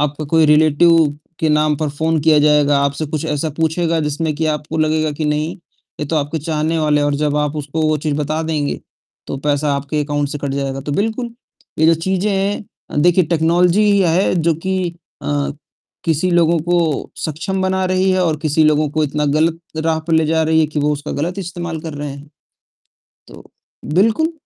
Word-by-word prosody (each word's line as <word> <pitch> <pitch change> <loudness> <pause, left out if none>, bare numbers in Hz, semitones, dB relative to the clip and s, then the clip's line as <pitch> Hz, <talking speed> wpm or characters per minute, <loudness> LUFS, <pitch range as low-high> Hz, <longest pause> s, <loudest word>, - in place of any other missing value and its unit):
आपका 150 +1 -1
कोई 160 -1 +4
रिलेटिव 155 +1 +4 0.3
के 160 - +2
नाम 150 0 +2
पर 155 0 -2
फ़ोन 160 +3 0
किया 155 0 +4
जाएगा, 145 -1 +4
आपसे 140 +2 -1
कुछ 155 0 -3
ऐसा 150 +1 -1
पूछेगा 165 +1 +1
जिसमें 150 +1 -2
कि 160 +1 -1
आपको 155 +1 -2
लगेगा 155 0 +1
कि 155 +1 -4
नहीं, 150 +4 -1 0.4
ये 150 - -2
तो 160 - -1
आपके 150 +2 -1
चाहने 160 +1 -1
वाले 150 -1 +2
हैं 145 - +1
और 145 - 0
जब 150 0 0
आप 150 0 -1
उसको 150 +2 -3
वो 155 - +2
चीज़ 150 0 -2
बता 155 +2 -1
देंगे 155 -3 -2 0.5
तो - - -4
पैसा 145 0 +1
आपके 145 +2 -2
अकाउंट 145 -1 -1
से 145 - -5
कट 140 0 -3
जाएगा। 135 -1 -3
तो 145 +1 -4
बिल्कुल 225 - -1 0.5
ये 160 - +4
जो 165 - +6
चीज़ें 190 +4 0
हैं, 195 -5 -3
देखिए 175 0 +4
टेक्नोलॉज़ी 170 +4 +2
ही 200 - +3
है 180 +3 +2
जो 165 -1 +2
कि 180 +1 -3 0.3
अ, 145 -1 -1 0.5
किसी 165 +2 +1
लोगों 170 -1 +3
को 170 -4 0
सक्षम 180 +5 -2
बना 190 0 0
रही 185 +1 +1
है 185 0 +2
और 160 -3 +1
किसी 155 0 +2
लोगों 155 0 +3
को 155 +1 0
इतना 150 +1 -1
गलत 165 +1 +1 0.2
राह 160 0 0
पर 165 - -2
ले 160 -1 +3
जा 160 +1 +2
रही 160 0 +3
है 155 - +3
कि 150 0 -3
वो 150 +1 +1
उसका 145 0 -5
गलत 175 +6 -3
इस्तेमाल 170 -3 -5
कर 160 -1 -6
रहे 145 0 -5
हैं। 140 +1 -10 1.0
तो - - -13 0.5
बिल्कुल 225 - +2
155 Hz, 200 wpm, -18 LUFS, 150-170 Hz, 1.0 s, जो